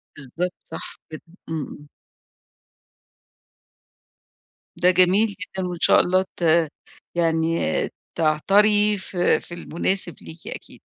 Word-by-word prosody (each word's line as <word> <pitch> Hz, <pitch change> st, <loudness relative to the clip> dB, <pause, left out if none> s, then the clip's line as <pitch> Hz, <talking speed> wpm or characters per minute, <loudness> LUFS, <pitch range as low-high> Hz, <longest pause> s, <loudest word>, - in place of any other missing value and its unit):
بالضبط، 165 Hz, +6 st, -4 dB
صح 160 Hz, -, -9 dB, 0.2 s
جدًا، 155 Hz, -, -8 dB, 0.3 s
امم، 160 Hz, -2 st, -3 dB
امم. 145 Hz, -, -12 dB, 2.9 s
ده 180 Hz, +1 st, +5 dB
جميل 185 Hz, +4 st, +4 dB
جدًا، 195 Hz, -2 st, -5 dB
وإن 175 Hz, -1 st, -5 dB
شاء -, -, +6 dB
الله 185 Hz, +1 st, +2 dB
ت 165 Hz, -2 st, +3 dB, 0.5 s
يعني 165 Hz, -1 st, +1 dB, 0.6 s
تعتري 205 Hz, +7 st, +3 dB
في 185 Hz, -2 st, +1 dB
في -, -, -11 dB
المُناسب 175 Hz, +1 st, -2 dB
ليكِ 160 Hz, +1 st, -11 dB
أكيد. -, -, -8 dB
175 Hz, 105 wpm, -23 LUFS, 160-190 Hz, 2.9 s, شاء